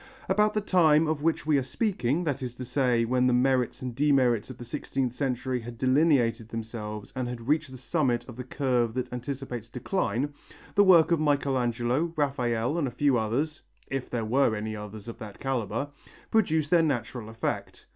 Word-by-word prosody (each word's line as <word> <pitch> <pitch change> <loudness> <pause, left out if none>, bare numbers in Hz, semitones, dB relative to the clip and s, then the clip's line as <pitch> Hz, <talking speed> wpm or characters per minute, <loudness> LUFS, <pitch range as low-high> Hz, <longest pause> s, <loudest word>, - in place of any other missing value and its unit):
About 210 0 +2
the 215 - +2
time 165 -6 +4
of 155 -2 -1
which 165 0 0
we 150 -2 +3
are - - -2
speaking, 170 - -1
that 145 -4 -2
is 125 -2 -5
to 125 - -6
say 125 -2 +2
when 125 +2 +2
the 125 - +3
merits 130 0 +1
and 125 -1 -4
demerits 130 -5 +2
of 130 - -8
the 120 - -9
sixteenth 130 -1 -2
century 125 -1 -1
had 120 +1 -8
delineated 130 -5 +2
themselves 110 -2 -6
and 130 -1 -2
had 120 -1 -6
reached 155 0 +1
the 130 - -9
summit 125 -3 0
of 120 - -9
the 125 - -6
curve 125 -3 0
that 125 -1 -3
anticipates 125 -2 -5
decline, 130 - -1 0.4
the 205 - +5
work 175 -4 +6
of 170 - +3
Michelangelo, 135 0 +1
Raphael 130 -1 0
and 145 - 0
a - - -2
few 135 +2 +2
others 135 +8 -1 0.3
if 135 -2 -3
there 115 -2 -2
were 120 0 +2
any 110 +1 -4
others 105 0 -8
of 115 - -8
that 105 -2 -9
calibre 135 0 -2 0.4
produced 160 -9 +2
their 175 -2 +6
natural 120 -6 -2
effect. 115 0 -4
130 Hz, 185 wpm, -27 LUFS, 120-145 Hz, 0.4 s, work